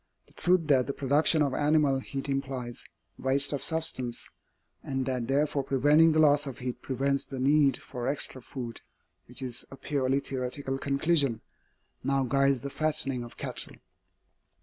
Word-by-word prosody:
The - - -20
truth 180 0 +2
that 130 -3 +4
the 140 - -2
production 150 +3 +3
of 140 -2 -1
animal 145 -1 +2
heat 135 +1 -5
implies 135 -3 -3 0.3
waste 140 +2 +2
of 140 - -2
substance, 140 -6 -1 0.5
and 135 -1 -3
that 125 -3 -2
therefore 145 +1 +1
preventing 145 +5 +4
the 155 - +1
loss 145 -1 +4
of 135 - -6
heat 125 -1 -5
prevents 140 +1 -1
the 135 - -7
need 140 0 +4
for 125 -1 -6
extra 135 -2 -1
food 120 -2 -7 0.5
which 125 +2 -6
is 125 -1 -4
a - - -10
purely 135 -1 0
theoretical 135 0 -4
conclusion 140 -3 +2 0.6
now 135 0 +1
guides 135 0 +2
the 140 - -5
fattening 135 -5 +1
of 120 - -12
cattle. - - -2
135 Hz, 155 wpm, -28 LUFS, 130-145 Hz, 0.6 s, that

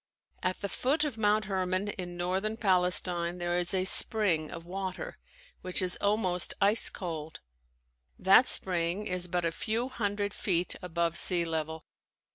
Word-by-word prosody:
At 185 0 -2
the 200 - -2
foot 280 +9 0
of 275 -7 -4
Mount 210 0 +2
Herman 190 0 -2
in 180 -3 -6
northern 190 +5 -2
Palestine 180 -3 +1
there 175 0 -1
is 175 0 -2
a 185 -1 +1
spring 185 -5 +4
of 165 0 -9
water 185 +1 -6 0.4
that 185 0 -2
is 185 -1 +3
almost 200 -4 +1
ice 205 +3 +4
cold. 160 -4 -7 0.8
That 195 +7 +5
spring 180 +2 0
is 180 -2 -2
but 175 -1 -2
a 165 - 0
few 225 +8 -3
hundred 205 -4 -3
feet 180 -3 -1
above 170 -2 -1
sea 175 -2 +5
level. 160 -1 -4
185 Hz, 150 wpm, -29 LUFS, 175-205 Hz, 0.8 s, That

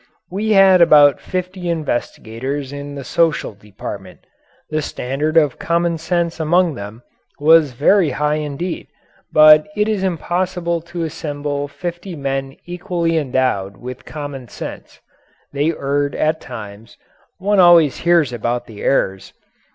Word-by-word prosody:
We 215 +3 0
had 190 -2 +6
about 150 -4 +6
fifty 185 -1 -4
investigators 135 -3 -3
in 145 0 -7
the 140 - -6
Social 160 -1 0
Department; 100 -2 -9 0.5
the 155 0 0
standard 145 +3 -2
of 150 -5 +3
common 170 -1 0
sense 170 0 -1
among 170 +1 +2
them 105 +1 -9 0.4
was 155 -2 +5
very 165 +7 +3
high 150 +2 0
indeed, 155 +4 -4 0.4
but 155 +1 +7
it 210 0 +1
is 215 -3 -1
impossible 175 -1 -1
to 170 -1 -4
assemble 145 -2 -4
fifty 175 +4 -6
men 135 -1 -3
equally 175 -2 -2
endowed 130 -9 -1
with 125 +3 -8
common 145 -4 -7
sense. - - -9 0.5
They 145 +3 +1
erred 145 -1 -2
at 155 +1 0
times 110 -2 -10 0.4
one 200 +1 +1
always 170 -5 +6
hears 170 -7 +2
about 120 +1 -2
the 105 -3 -11
errors. 95 -8 0
150 Hz, 130 wpm, -18 LUFS, 135-175 Hz, 0.5 s, but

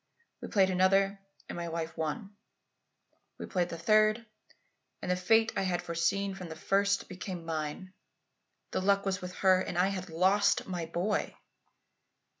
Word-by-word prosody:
We - - -5
played 190 -3 +3
another 195 +2 +3 0.3
and - - -6
my 170 0 -4
wife 165 0 -4
won. 160 +6 -4 1.0
We - - -6
played 180 -2 -1
the 165 - -5
third 215 +5 +3 0.7
and - - -3
the - - +3
fate 225 +5 +3
I - - +1
had 185 -2 -1
foreseen 195 +4 0
from 185 -3 -8
the 160 - -7
first 200 +4 +1
became 185 -2 -6
mine. 160 +3 -4 0.8
The - - -1
luck 200 +1 +2
was 195 -1 -1
with 180 0 -7
her, 185 -1 +6
and 180 - -4
I 185 +2 +3
had 190 -2 -5
lost 190 +5 +3
my 175 -3 -3
boy!" 180 +6 -1
185 Hz, 160 wpm, -30 LUFS, 170-200 Hz, 1.0 s, her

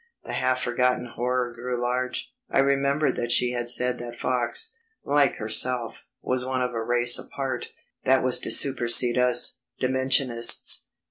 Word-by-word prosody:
The - - -6
half 130 0 0
forgotten 125 +1 0
horror 125 0 -2
grew 125 +1 -5
large; 125 +1 -3 0.2
I - - -1
remembered 140 +2 +1
that 120 0 -2
she 125 0 +4
had 120 -1 -3
said 125 0 0
that 120 0 -8
Fox, 130 - -1 0.3
like 145 -1 +2
herself, 115 +2 -1 0.2
was 130 0 -1
one 130 0 -2
of 125 0 -3
a 115 - -3
race 120 +1 +2
apart, 135 -3 -5 0.4
that 130 0 +3
was 130 -1 +3
to - - -1
supersede 125 -2 +4
us 125 0 +2 0.2
Dimensionists. 130 -2 +2
125 Hz, 150 wpm, -25 LUFS, 120-130 Hz, 0.4 s, she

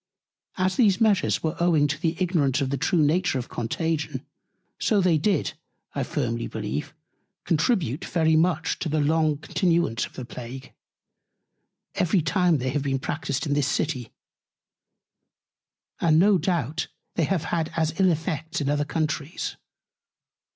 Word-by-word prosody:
As 185 0 +1
these 210 -6 +4
Measures 210 -5 +2
were 160 0 -1
owing 170 -4 +3
to 145 +1 -2
the 165 -2 0
Ignorance 160 -8 +1
of 135 -2 -1
the 140 - 0
true 160 +4 +2
Nature 160 0 +2
of 125 - -5
Contagion, 160 +7 -2 0.5
so 215 - +2
they 180 -4 +3
did, 190 -1 +1 0.4
I - - -2
firmly 115 -4 -2
believe, 70 +3 -4 0.5
contribute 165 - +1
very 160 -2 +2
much 165 0 +1
to 165 - -2
the 155 +1 +1
long 155 0 +2
Continuance 165 - 0
of - - -22
the 130 - -7
Plague, 125 +2 -9 1.2
every 180 -1 +2
time 175 0 +2
they 130 -1 -2
have 145 +1 0
been 135 -1 0
practised 140 +1 -3
in 145 - 0
this 145 -1 +1
City: 145 -6 -1 1.9
And 160 -2 +4
no 195 +2 +5
doubt 160 -3 -1 0.3
they 165 - +1
have 175 0 0
had 165 -2 -1
as 160 -1 +1
ill 190 -1 +5
Effects 165 0 -2
in 140 -2 -1
other 145 0 +1
Countries. 155 0 -2
160 Hz, 150 wpm, -25 LUFS, 140-175 Hz, 1.9 s, no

